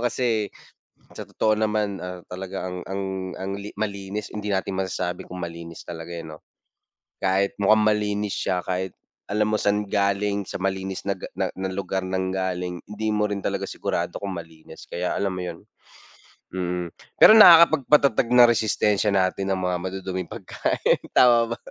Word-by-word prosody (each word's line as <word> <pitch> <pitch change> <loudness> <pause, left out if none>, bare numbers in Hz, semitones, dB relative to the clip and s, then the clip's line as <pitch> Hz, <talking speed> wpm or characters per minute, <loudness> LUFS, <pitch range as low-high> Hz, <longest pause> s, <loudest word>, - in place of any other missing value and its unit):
kasi 120 -3 0 0.6
sa - - -7
totoo 110 - +1
naman, 105 -2 0
ah, 90 0 -6
talaga 95 0 -5
ang 90 - -5
ang 95 +1 -3 0.4
ang 95 +1 -4
li 105 +1 -7
malinis 100 0 -4
hindi 105 -1 -5
natin 95 0 -1
masasabi 90 -1 -3
kung 90 - -7
malinis 85 -1 -9
talaga 85 0 -8
yan 80 -2 -8
no? - - -21 0.8
Kahit 95 +1 +1
mukhang 110 +2 +5
malinis 105 -1 -2
siya 90 - -1
kahit 95 0 -2 0.4
alam 105 +1 +1
mo 110 - +2
san 105 0 +1
galing 100 +1 0
sa - - -4
malinis 95 0 -3
na 100 - +1
ga - - -7
na - - +1
na 95 0 -3
lugar 95 0 -2
nanggaling 95 -1 -2
hindi 105 +1 -5
mo 105 0 +1
rin 100 - -2
talaga - - -1
sigurado - - -3
kung 100 -2 -5
malinis 80 -2 -11
kaya 90 +1 -2
alam 100 - 0
mo 90 - -4
yun? 85 -2 -6 1.0
Mm 90 -1 -2 0.3
pero - - +11
nakakapag-patatag 150 - +7
ng 120 -1 +8
resistensya 105 -2 +1
natin 95 0 +1
ang 95 - -1
mga 90 -1 0
maduduming 95 -1 -4
pagkain - - -1 0.2
tama 115 -2 +5
ba? - - -31
95 Hz, 165 wpm, -24 LUFS, 90-105 Hz, 1.0 s, pero